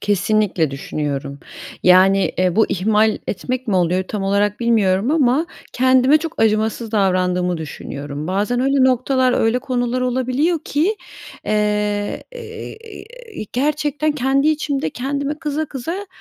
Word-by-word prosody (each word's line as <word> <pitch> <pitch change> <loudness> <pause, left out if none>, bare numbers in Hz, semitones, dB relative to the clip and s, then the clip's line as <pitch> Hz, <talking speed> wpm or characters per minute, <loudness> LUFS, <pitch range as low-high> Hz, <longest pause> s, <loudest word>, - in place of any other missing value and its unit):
Kesinlikle 200 -4 +1
düşünüyorum, 140 0 -4 0.4
yani, 190 +2 +5
eee, 185 -1 +1
bu 220 - +4
ihmal 215 +3 +2
etmek 255 +5 -3
mi 195 - +2
oluyor 180 +1 +1
tam 195 +2 -5
olarak 200 +2 0
bilmiyorum 220 -2 +2
ama 295 0 +2 0.3
kendime 260 +3 +4
çok 320 -4 -6
acımasız 220 +1 0
davrandığımı 180 -3 +1
düşünüyorum. 145 -1 -6
Bazen 205 +7 0
öyle 270 0 +3
noktalar, 255 0 +2
öyle 225 0 +2
konular 250 0 -2
olabiliyor 255 +6 0
ki, 340 +10 0 0.5
eee, 210 -1 0
e - - -9
e 450 0 -8 0.7
e - - -3
gerçekten 300 +2 0
kendi 275 +1 +1
içimde 290 - -1
kendime 280 - -3
kıza, 305 0 -2
kıza 330 +10 -5
230 Hz, 130 wpm, -19 LUFS, 190-275 Hz, 0.7 s, yani